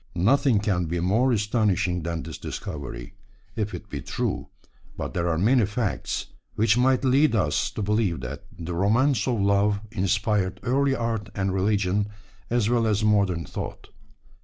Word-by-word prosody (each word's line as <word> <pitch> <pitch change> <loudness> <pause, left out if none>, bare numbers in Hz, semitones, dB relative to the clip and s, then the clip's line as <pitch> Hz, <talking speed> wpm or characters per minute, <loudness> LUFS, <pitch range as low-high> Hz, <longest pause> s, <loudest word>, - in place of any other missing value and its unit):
Nothing 115 - +3
can 95 -4 0
be 85 +2 -2
more 110 +9 +2
astonishing 105 -5 +1
than 85 0 -3
this 80 -3 -8
discovery, 70 -5 -6 0.4
if 105 -1 -2
it - - -9
be - - -5
true, - - -3 0.5
but - - -4
there 85 0 0
are 80 - 0
many 115 +7 +4
facts 105 -1 -2 0.3
which 110 0 +3
might 130 +1 +3
lead 135 +1 +4
us 85 -9 +1
to 105 - -4
believe 100 - 0
that 70 +5 -6
the 85 +1 -5
romance 110 +6 +2
of 120 -4 +1
love 100 +1 +2
inspired 100 0 0
early 135 +2 +2
art 115 -4 -2
and 95 -1 0
religion 100 +1 +1 0.4
as 120 -3 +1
well 115 -1 +2
as 105 0 +1
modern 100 -6 +2
thought. - - -7
105 Hz, 160 wpm, -25 LUFS, 90-115 Hz, 0.5 s, many